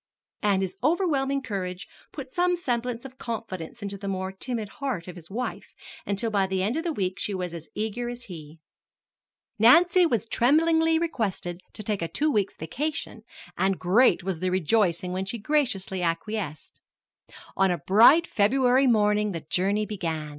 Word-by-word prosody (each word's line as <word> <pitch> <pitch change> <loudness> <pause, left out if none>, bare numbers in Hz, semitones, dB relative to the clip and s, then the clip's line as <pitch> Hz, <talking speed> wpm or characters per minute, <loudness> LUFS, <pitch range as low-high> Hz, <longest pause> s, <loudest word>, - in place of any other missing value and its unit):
And 200 -3 +2
his 185 -1 -4
overwhelming 275 -4 +1
courage 185 -5 -4 0.2
put 270 -3 -8
some 355 +2 +2
semblance 245 -6 -3
of 260 -1 -11
confidence 225 -2 -6
into 200 -1 -5
the 200 - -6
more 190 -1 -2
timid 220 +2 -4
heart 250 -12 -2
of 180 - -8
his 170 -2 -12
wife, 245 +6 -5 0.3
until 205 +3 -1
by 195 -2 +2
the 190 0 -1
end 215 +6 0
of 325 - -2
the 345 - -1
week 190 -7 -2
she 200 -1 -2
was 180 -2 -4
as 165 -2 -8
eager 220 +3 -3
as 245 0 -7
he. 160 -6 -10 1.0
Nancy 340 - +6
was 230 - 0
tremblingly 320 +7 +3
requested 205 - -2
to 215 - -8
take 210 -2 -2
a 165 - -1
two 300 - 0
weeks' 205 -5 0
vacation, 275 - -4 0.4
and 190 0 +2
great 185 +4 +3
was 185 -3 -3
the 185 - 0
rejoicing 180 0 +1
when 190 +1 -2
she 215 +5 -3
graciously 220 -7 -1
acquiesced. 170 -1 -3 0.7
On 195 0 +3
a 175 - 0
bright 235 - +6
February 255 +4 +3
morning 210 -3 +2
the 165 - -4
journey 200 +4 +1
began. 165 -7 -4
210 Hz, 170 wpm, -26 LUFS, 185-255 Hz, 1.0 s, Nancy